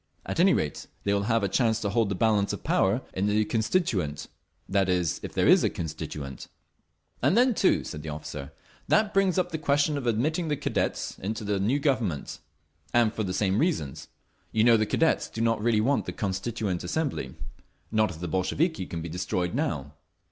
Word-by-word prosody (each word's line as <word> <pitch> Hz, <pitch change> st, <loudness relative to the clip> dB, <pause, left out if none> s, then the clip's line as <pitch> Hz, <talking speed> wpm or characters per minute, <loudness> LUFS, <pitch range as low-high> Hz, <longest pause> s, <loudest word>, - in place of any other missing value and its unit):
At -, -, -3 dB
any 190 Hz, +2 st, +6 dB
rate, 75 Hz, -, -3 dB, 0.2 s
they 100 Hz, -, +1 dB
will 100 Hz, 0 st, 0 dB
have 115 Hz, -2 st, +2 dB
a -, -, +2 dB
chance 110 Hz, +2 st, +2 dB
to 100 Hz, -, -1 dB
hold 110 Hz, -1 st, +2 dB
the 100 Hz, -, -1 dB
balance 105 Hz, -1 st, +2 dB
of -, -, -6 dB
power 105 Hz, +7 st, +2 dB
in 95 Hz, +2 st, 0 dB
the 105 Hz, +1 st, +2 dB
Constituent—that 100 Hz, -, -1 dB
is, 90 Hz, -3 st, +1 dB
if -, -, -6 dB
there -, -, +2 dB
is -, -, +6 dB
a -, -, +3 dB
Constituent." 75 Hz, -4 st, -6 dB, 0.7 s
"And 195 Hz, -, +3 dB
then, 250 Hz, +1 st, +5 dB
too," 195 Hz, -, +2 dB
said 75 Hz, -, -6 dB
the 80 Hz, -, -6 dB
officer, 75 Hz, -2 st, -6 dB, 0.4 s
"that 215 Hz, -1 st, +3 dB
brings 195 Hz, -2 st, +3 dB
up 180 Hz, -1 st, +1 dB
the 160 Hz, -, -3 dB
question 145 Hz, 0 st, +2 dB
of 125 Hz, -, -5 dB
admitting 155 Hz, +10 st, 0 dB
the 150 Hz, -2 st, 0 dB
Cadets 145 Hz, -, -2 dB
into 110 Hz, +3 st, -4 dB
the 100 Hz, -1 st, 0 dB
new 110 Hz, +8 st, +2 dB
Government—and 120 Hz, -, -2 dB
for -, -, -3 dB
the 95 Hz, -3 st, -2 dB
same 95 Hz, +2 st, +1 dB
reasons. 145 Hz, -, -1 dB, 0.4 s
You 110 Hz, -, +2 dB
know 120 Hz, 0 st, +7 dB
the 110 Hz, -1 st, +2 dB
Cadets 160 Hz, +7 st, +1 dB
do -, -, -7 dB
not 115 Hz, -1 st, +1 dB
really 110 Hz, -1 st, +3 dB
want 135 Hz, +5 st, +1 dB
the -, -, -3 dB
Constituent 100 Hz, -1 st, -2 dB
Assembly—not 110 Hz, -, -3 dB
if 85 Hz, -4 st, -8 dB
the 90 Hz, -, -4 dB
Bolsheviki 95 Hz, -, 0 dB
can 85 Hz, -1 st, -5 dB
be -, -, -4 dB
destroyed 90 Hz, +1 st, -2 dB
now." 75 Hz, -2 st, -2 dB
110 Hz, 190 wpm, -27 LUFS, 90-140 Hz, 0.7 s, know